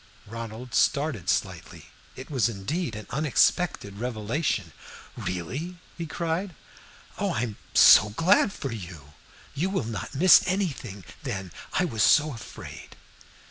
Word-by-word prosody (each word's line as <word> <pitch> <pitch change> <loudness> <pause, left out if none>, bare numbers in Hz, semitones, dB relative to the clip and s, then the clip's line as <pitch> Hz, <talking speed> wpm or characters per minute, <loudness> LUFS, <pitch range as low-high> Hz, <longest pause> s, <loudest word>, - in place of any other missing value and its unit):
Ronald 115 +2 -8
started 140 - +1
slightly. - - -3 0.2
It 130 +4 -10
was 125 -5 +2
indeed 115 - -3
an 110 - -7
unexpected 140 - +1
revelation. 115 - -2 0.4
"Really?" 135 - -4 0.2
he 170 -1 -5
cried. 170 +3 -3 0.6
"Oh, - - 0
I 110 - -1
am 110 -4 -3 0.2
so 110 - +8
glad 175 - +3
for 135 -8 -5
you. 85 -9 -9 0.4
You 165 +7 -1
will 190 - -1
not 110 +3 -6
miss 180 +6 +7
anything, 140 - -3 0.2
then. 95 -3 -5 0.2
I 180 - +2
was 110 -11 -2
so 150 +7 +5
afraid." 115 - -10
125 Hz, 130 wpm, -26 LUFS, 105-165 Hz, 0.6 s, so